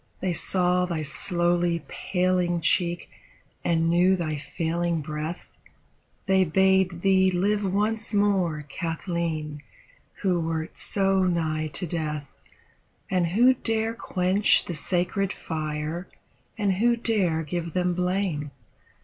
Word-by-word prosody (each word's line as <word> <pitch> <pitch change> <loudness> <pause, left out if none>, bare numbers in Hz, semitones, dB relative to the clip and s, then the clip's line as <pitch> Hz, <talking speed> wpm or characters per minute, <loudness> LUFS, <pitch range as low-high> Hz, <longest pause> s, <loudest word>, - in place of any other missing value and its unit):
They 185 -2 -1
saw 180 0 +1
thy 165 -3 -2
slowly 175 +1 0
paling 180 -1 0
cheek 175 +1 0 0.6
and 165 -1 +2
knew 175 +3 +4
thy 155 -4 -2
failing 170 +2 -2
breath, 155 +3 -5 0.8
They 190 -1 +4
bade 190 0 +2
thee 190 -1 +4
live 200 +3 +1
once 215 +3 0
more, 190 -7 +1
Kathleen, 165 -2 -3 0.6
who 185 -3 +2
wert 165 0 -3
so 195 -1 +2
nigh 160 -3 0
to 180 - +1
death. 155 -3 -3 0.8
And 180 -2 +2
who 235 +9 +5
daxe 225 -1 0
quench 185 +2 +2
the 175 - -4
sacred 180 +5 -1
fire, 155 +1 -4 0.5
and 200 -4 +1
who 235 +3 +3
dare 195 -9 +1
give 170 +1 -4
them 180 -1 +1
blame. 180 -4 -1
175 Hz, 115 wpm, -26 LUFS, 165-190 Hz, 0.8 s, who